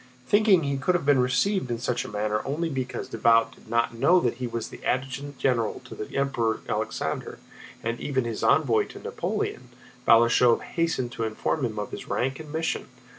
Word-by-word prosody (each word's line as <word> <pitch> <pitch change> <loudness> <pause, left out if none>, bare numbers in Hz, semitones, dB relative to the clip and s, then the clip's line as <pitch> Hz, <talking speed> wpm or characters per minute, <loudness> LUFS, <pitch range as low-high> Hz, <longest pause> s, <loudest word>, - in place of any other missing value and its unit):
Thinking 205 - +4
he 140 -1 -1
could 180 +6 +1
have 175 - -1
been 145 -2 +5
received 125 +7 +1
in 120 - -1
such 125 +1 -1
a - - -7
manner 105 +1 -1
only 160 +5 -2
because 130 -3 -4
Davout 115 0 +3
did - - -19
not 115 0 +1
know 140 +10 +4
that 120 -4 0
he 125 -1 -3
was 115 -1 -5
adjutant 135 +2 -2
general 115 -4 0
to - - -9
the 105 - -6
Emperor 120 -5 0
Alexander - - -3 0.5
and 115 +1 -2
even 130 -3 -1
his 115 -2 -4
envoy 135 -7 +3
to - - -11
Napoleon, - - -3 0.4
Balashëv 120 +1 +5
hastened 165 -8 -1
to 115 - -4
inform 110 +6 -1
him 110 -2 -4
of 105 - -4
his - - -7
rank 135 +2 -1
and 155 -2 -9
mission. 160 +1 -2
125 Hz, 185 wpm, -26 LUFS, 115-145 Hz, 0.5 s, been